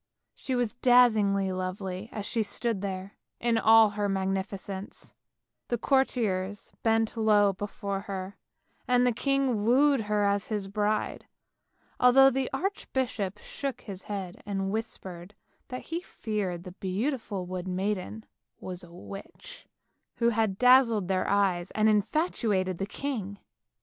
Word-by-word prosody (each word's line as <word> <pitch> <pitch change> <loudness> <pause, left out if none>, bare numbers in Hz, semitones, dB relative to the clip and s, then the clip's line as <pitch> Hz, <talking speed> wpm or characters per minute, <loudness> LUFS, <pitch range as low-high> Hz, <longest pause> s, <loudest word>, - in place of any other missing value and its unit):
She 260 - -4
was 245 -3 0
dazzingly 220 -6 +4
lovely 185 +2 -4
as 210 -2 -5
she 230 - 0
stood 220 0 -2
there 195 0 -5 0.2
in 235 -1 +2
all 225 -1 +6
her 205 -1 -1
magnificence; 195 0 -4 0.5
the 240 - 0
courtiers 210 -7 0
bent 225 0 +1
low 210 -3 +4
before 200 0 -4
her, 195 -1 -6 0.5
and 250 0 +4
the 250 - +4
king 265 -3 0
wooed 270 +3 +4
her 210 -1 0
as 200 0 +1
his 205 -3 -2
bride, 210 +1 -1 0.7
although 270 +2 +7
the 265 0 -1
archbishop 260 - -2
shook 270 +4 -5
his 195 -3 -8
head, 195 -4 -5
and 195 -1 -2
whispered 195 -4 -6 0.3
that 255 - -6
he 340 - -1
feared 200 - -4
the 180 - -8
beautiful 200 +1 -3
wood 185 0 -5
maiden 195 +3 -3 0.3
was 180 -1 -6
a 170 - -13
witch, 190 +3 -10 0.5
who 235 -1 +2
had 220 -4 0
dazzled 240 -6 +5
their 185 -1 +1
eyes 190 -3 +1
and 215 0 +3
infatuated 210 - +1
the 195 - -2
king. 210 -5 -4
205 Hz, 135 wpm, -28 LUFS, 190-235 Hz, 0.7 s, although